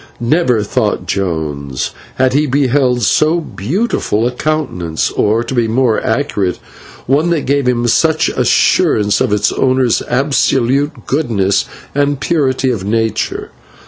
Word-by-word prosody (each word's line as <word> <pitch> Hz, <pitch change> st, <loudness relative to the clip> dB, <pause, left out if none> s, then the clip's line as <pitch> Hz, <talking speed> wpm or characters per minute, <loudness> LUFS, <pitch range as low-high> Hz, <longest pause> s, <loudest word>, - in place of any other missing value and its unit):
Never, 125 Hz, -3 st, +1 dB
thought 100 Hz, -, -1 dB
Jones, 75 Hz, -8 st, -3 dB, 0.2 s
had 130 Hz, 0 st, +1 dB
he 150 Hz, +2 st, +2 dB
beheld 130 Hz, -2 st, +1 dB
so 155 Hz, +10 st, +2 dB
beautiful 155 Hz, -, -2 dB
a 125 Hz, -, 0 dB
countenance, 125 Hz, -, -2 dB
or, 110 Hz, +3 st, +1 dB
to 125 Hz, -, -5 dB
be 120 Hz, -3 st, +1 dB
more 115 Hz, 0 st, +1 dB
accurate, 110 Hz, -, -1 dB, 0.5 s
one 145 Hz, +6 st, +1 dB
that 165 Hz, -4 st, 0 dB
gave 140 Hz, -1 st, 0 dB
him 120 Hz, -1 st, +1 dB
such 160 Hz, +7 st, +2 dB
assurance 105 Hz, -1 st, +2 dB
of 130 Hz, -4 st, +1 dB
its 105 Hz, 0 st, +1 dB
owner's 130 Hz, -2 st, +1 dB
absolute 135 Hz, +2 st, 0 dB
goodness 110 Hz, -9 st, 0 dB, 0.3 s
and 145 Hz, 0 st, 0 dB
purity 135 Hz, -5 st, 0 dB
of 110 Hz, -6 st, -3 dB
nature. 110 Hz, +2 st, -2 dB
125 Hz, 130 wpm, -14 LUFS, 105-145 Hz, 0.5 s, he